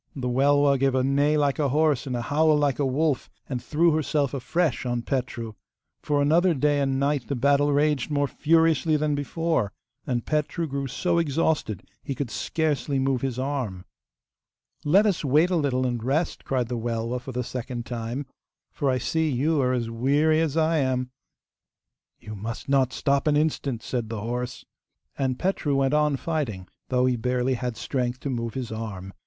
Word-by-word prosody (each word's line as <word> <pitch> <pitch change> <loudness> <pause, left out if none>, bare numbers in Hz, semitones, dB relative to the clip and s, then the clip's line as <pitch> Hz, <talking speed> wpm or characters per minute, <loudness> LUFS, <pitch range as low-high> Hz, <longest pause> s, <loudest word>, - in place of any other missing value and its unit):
The 130 -3 -3
Welwa 140 +2 +3
gave 135 -1 +2
a 130 - +2
neigh 145 +3 +2
like 145 0 +1
a 145 -2 +2
horse 150 -1 +2
and 125 - -2
a 120 - -2
howl 155 +3 +3
like 145 -3 +1
a 145 - +2
wolf, 145 +1 0 0.2
and 125 -3 -3
threw 165 +2 +3
herself 150 -2 0
afresh 145 +4 0
on 120 -1 -2
Petru. 125 -4 -3 0.5
For 145 -1 +1
another 170 +4 +3
day 145 +1 +2
and 135 -1 0
night 140 -2 0
the 140 - -1
battle 140 +3 +3
raged 145 -1 +1
more 145 -1 +1
furiously 160 +1 +2
than 150 0 0
before. 145 - -1 0.4
And 120 -3 -1
Petru 155 +2 -1
grew 140 -2 -3
so 170 +6 0
exhausted 150 - 0 0.2
he 135 - -4
could 130 -3 -4
scarcely 150 -3 -1
move 135 -1 +1
his 130 -3 -2
arm. 130 -9 -3 1.0
'Let 190 +8 +4
us 200 -6 +1
wait 150 +6 +3
a - - +2
little 135 -5 +1
and 120 -3 -2
rest,' 145 +7 -1
cried 125 -3 0
the 120 0 -3
Welwa 115 +1 -2
for 130 - -7
the 125 0 -2
second 120 -1 -5
time, 120 +3 -4 0.5
'for 140 - -1
I 130 - +2
see 160 +4 0
you 145 +3 +1
are 125 -1 +2
as 120 -2 -1
weary 145 +7 +2
as 160 -1 -1
I 160 0 +3
am.' 130 -2 0 1.1
'You 110 - -9
must 110 +3 -6
not 135 -2 +3
stop 140 +4 0
an 145 -1 +4
instant,' 145 -6 -1
said 120 -4 -3
the 115 -2 -4
horse. 120 +2 -4 0.5
And 130 -2 -1
Petru 180 -6 0
went 135 0 +2
on 150 -1 +3
fighting, 135 - -3 0.2
though 125 0 +2
he 130 -1 +2
barely 125 +2 0
had 125 -2 -3
strength 125 0 -2
to 140 - -3
move 115 -1 -3
his 130 -4 -4
arm. 100 -4 -6
135 Hz, 185 wpm, -25 LUFS, 125-150 Hz, 1.1 s, Let